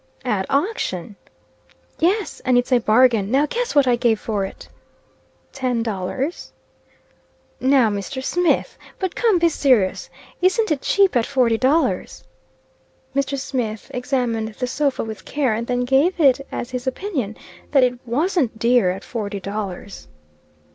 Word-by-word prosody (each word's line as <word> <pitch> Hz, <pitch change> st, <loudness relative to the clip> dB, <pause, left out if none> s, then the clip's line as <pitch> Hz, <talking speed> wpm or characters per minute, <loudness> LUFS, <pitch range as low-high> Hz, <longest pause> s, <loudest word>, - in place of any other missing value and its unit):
"At 205 Hz, -6 st, 0 dB
auction!" 275 Hz, -, -1 dB, 0.8 s
"Yes; 385 Hz, +5 st, 0 dB
and 255 Hz, -2 st, +2 dB
it's 245 Hz, +2 st, 0 dB
a 250 Hz, -, +5 dB
bargain. 225 Hz, -2 st, +3 dB
Now 275 Hz, +5 st, +3 dB
guess 475 Hz, +7 st, -3 dB
what 285 Hz, -2 st, +5 dB
I 250 Hz, -1 st, +3 dB
gave 235 Hz, -3 st, +1 dB
for 210 Hz, -3 st, -2 dB
it?" -, -, -10 dB, 0.9 s
"Ten 250 Hz, -4 st, -1 dB
dollars?" 225 Hz, -, -4 dB, 1.1 s
"Now 260 Hz, -4 st, +4 dB
Mr. 205 Hz, +7 st, -4 dB
Smith! 355 Hz, +5 st, 0 dB, 0.2 s
But 375 Hz, -2 st, -2 dB
come; 450 Hz, -6 st, +2 dB
be 340 Hz, 0 st, +4 dB
serious. 255 Hz, -, +2 dB, 0.3 s
Isn't 380 Hz, +2 st, +2 dB
it 285 Hz, -3 st, 0 dB
cheap 395 Hz, -6 st, +3 dB
at 235 Hz, -2 st, +2 dB
forty 245 Hz, -5 st, +2 dB
dollars?" 285 Hz, +6 st, +1 dB, 0.9 s
Mr. 275 Hz, 0 st, 0 dB
Smith 240 Hz, -5 st, -4 dB
examined 240 Hz, -4 st, -2 dB
the 250 Hz, -, -2 dB
sofa 280 Hz, +2 st, -1 dB
with 220 Hz, -4 st, -7 dB
care, 275 Hz, -6 st, 0 dB
and 230 Hz, +2 st, -3 dB
then 245 Hz, 0 st, 0 dB
gave 270 Hz, +9 st, +2 dB
it 275 Hz, -2 st, +3 dB
as 240 Hz, -, -5 dB
his 250 Hz, 0 st, -5 dB
opinion 260 Hz, -, -3 dB, 0.3 s
that 275 Hz, -3 st, +4 dB
it 250 Hz, -1 st, +1 dB
wasn't 265 Hz, -, 0 dB
dear 235 Hz, -4 st, +3 dB
at 185 Hz, +2 st, -4 dB
forty 205 Hz, -4 st, -4 dB
dollars. 200 Hz, -, -6 dB
250 Hz, 145 wpm, -21 LUFS, 220-285 Hz, 1.1 s, a